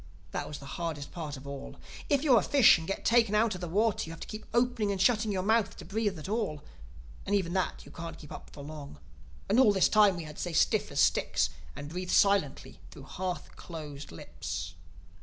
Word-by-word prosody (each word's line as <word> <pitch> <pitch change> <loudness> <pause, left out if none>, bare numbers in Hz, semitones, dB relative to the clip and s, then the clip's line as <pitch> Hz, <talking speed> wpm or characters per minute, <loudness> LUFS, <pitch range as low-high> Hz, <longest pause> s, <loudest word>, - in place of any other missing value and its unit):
That - - -3
was 150 - -6
the 140 - -11 0.2
hardest 155 -4 -4
part 155 -5 -5
of 130 - -12
all. 140 -1 -7 0.3
If 285 -1 +2
you're 260 -7 +6
a - - -1
fish 275 -11 +6
and 160 - -7
get 195 - -3
taken 230 -3 +4
out 220 0 +3
of 180 - -7
the 175 - -3
water 210 +5 +1
you 165 - -8
have 165 - -9
to - - -6
keep 215 0 -8
opening 240 -3 +1
and 195 - -2
shutting 215 +1 +3
your 185 -2 -1
mouth 220 +1 +2
to - - -9
breathe 205 -2 -1
at 155 - -7
all—and 145 - -5
even 180 -4 0
that 185 -1 -1
you - - -13
can't 165 -1 -7
keep 150 - -13
up - - -9
for 140 - -10
long. 145 - -9 0.5
And 225 - +3
all 245 -5 +7
this 190 -3 +3
time 205 -4 +5
we 170 - -5
had 150 -1 -10
to - - -5
stay 175 - -3
stiff - - +2
as - - -2
sticks - - +2 0.2
and 140 0 -7
breathe 180 +2 -5
silently 195 -10 +2
through 140 - -12
half 180 +6 -5
closed 150 -4 -8
lips. 80 0 -6
180 Hz, 225 wpm, -30 LUFS, 150-215 Hz, 0.5 s, all